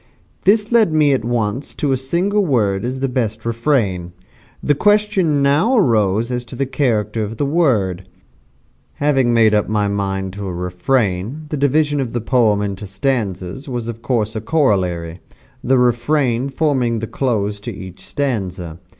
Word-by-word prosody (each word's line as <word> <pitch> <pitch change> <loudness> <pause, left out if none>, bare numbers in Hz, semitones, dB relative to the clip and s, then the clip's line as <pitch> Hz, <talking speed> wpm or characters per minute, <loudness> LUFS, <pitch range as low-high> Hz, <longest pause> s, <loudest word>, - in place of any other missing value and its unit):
This 210 +2 +3
led 225 -7 +4
me 150 -2 +3
at 130 - 0
once 120 +2 -2
to 145 - -1
a - - +3
single 175 +11 0
word 105 - +1
as 130 +2 -3
the 135 - +1
best 115 -4 -2
refrain. 115 - 0 0.5
The 145 - +3
question 200 -5 +2
now 155 - +3
arose 110 - +2
as 125 0 -2
to 120 - -10
the 135 - -1
character 115 -6 0
of 110 +1 -4
the 145 - 0
word. 110 - +1 0.9
Having 135 -4 +2
made 115 -2 +4
up 105 -1 +1
my 105 -1 +1
mind 95 -1 -2
to 100 0 -6
a 90 - -4
refrain, 95 - -1
the 155 - -2
division 145 +1 +2
of 130 -4 -3
the 120 - 0
poem 110 -3 +2
into 100 0 -4
stanzas 100 +2 -3
was 120 -2 -4
of 115 -1 -6
course 115 -3 -1
a 110 - -2
corollary, 95 - 0 0.4
the 130 +1 +3
refrain 125 +1 +1
forming 135 -5 0
the 110 - -3
close 105 -5 -1
to 100 - -6
each 95 -1 -10
stanza. 95 - -3
120 Hz, 165 wpm, -18 LUFS, 100-140 Hz, 0.9 s, led